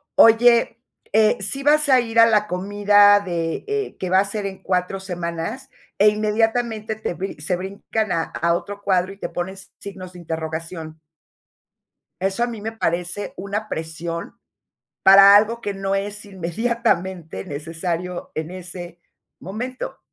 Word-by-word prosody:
"Oye, 230 +1 +5 0.3
eh 215 0 +4
¿sí 210 +8 +2
vas 300 +1 +4
a 255 -2 +6
ir 230 -1 -1
a 230 - +9
la 210 -2 +2
comida 205 +2 +4
de, 170 -4 -3
eh, 425 -1 -2
que 185 - -3
va 185 - +5
a - - -1
ser 200 0 -2
en 190 -1 -9
4 180 +1 -1
semanas?", 180 +7 -5 0.3
e 210 +1 +7
inmediatamente 220 +1 0
te 220 -4 -4
brin 190 -2 -6
se 155 +5 0
brincan 200 +3 -3
a 165 -1 +1
a 170 0 -1
otro 200 +3 -6
cuadro, 190 -1 +1
y - - -17
te - - -4
ponen 175 +2 -4
s 190 -1 -11
signos 185 -2 -9
de 180 - -11
interrogación. 160 0 -6 1.2
Eso 195 +5 0
a 240 - +1
mí 230 -3 -7
me 220 +2 -4
parece 180 -2 -2
una 205 +3 -4
presión, 165 +1 -5 0.6
para 195 +1 +9
algo 225 +3 +2
que 205 -3 -4
no 195 0 -2
es 205 +1 -3
inmediatamente 190 - -2
necesario 165 +4 -4
en 155 +1 -4
ese 175 -1 -8 0.4
momento. 240 +8 -6
195 Hz, 155 wpm, -22 LUFS, 175-215 Hz, 1.2 s, a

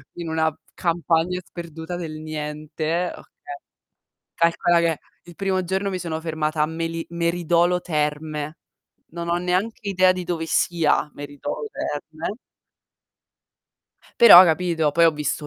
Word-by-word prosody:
in 170 -1 -6
una 160 -1 +1 0.2
campagna 170 +1 0
sperduta 165 0 -7
del 160 -3 -6
niente, 155 +2 -3
okay - - -13 1.1
Calcola 170 +1 +2
che 165 -3 +1 0.3
il 170 - -13
primo 190 -1 -1
giorno 190 +2 -1
mi 185 -1 -3
sono 160 -2 -4
fermata 155 -1 -2
a - - +4
meli 165 +1 -4
Meridolo 170 +1 +1
Terme. 150 -1 -3 0.6
Non 170 0 -5
ho 170 - +2
neanche 185 +4 -2
idea 185 -1 +4
di 185 -1 -3
dove 165 -2 -2
sia 160 -3 +1
Meridolo 145 +1 -6
Terme 160 +6 -5 1.9
però, 185 -6 +11
capito, 165 -2 +1
poi 170 +1 +4
ho 165 - +6
visto 150 0 -3
165 Hz, 130 wpm, -23 LUFS, 155-175 Hz, 1.9 s, però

